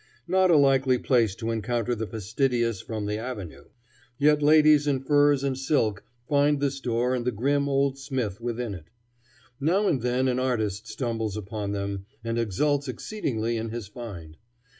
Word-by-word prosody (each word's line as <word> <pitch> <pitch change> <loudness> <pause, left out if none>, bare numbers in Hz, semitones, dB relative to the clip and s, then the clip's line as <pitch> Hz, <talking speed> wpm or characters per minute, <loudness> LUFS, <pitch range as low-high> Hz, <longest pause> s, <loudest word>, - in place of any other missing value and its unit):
Not 185 +1 +3
a 165 - +6
likely 135 -2 +4
place 115 -6 +2
to 115 0 -3
encounter 120 +1 -1
the 110 -2 -3
fastidious 115 +1 -1
from 110 -2 -5
the 105 +1 -2
Avenue! 110 -8 -7 0.5
Yet 150 +1 +4
ladies 150 0 +5
in 135 -2 +1
furs 145 0 +3
and 135 -1 0
silk 130 -6 0 0.2
find 145 0 +3
this 140 -1 -1
door 125 0 0
and 125 -2 -1
the 125 - 0
grim 140 +6 0
old 135 0 +1
smith 125 -7 -3
within 120 -2 -3
it. 80 -4 -10 0.7
Now 180 +8 +2
and 135 -9 +1
then 125 +2 +1
an 125 0 +1
artist 110 -4 -1
stumbles 115 -5 -3
upon 105 0 -4
them, 100 -1 -4 0.2
and 115 0 -2
exults 140 +7 0
exceedingly 120 - -3
in 110 0 -3
his 115 -1 -5
find. 95 -8 -9
125 Hz, 165 wpm, -26 LUFS, 110-140 Hz, 0.7 s, a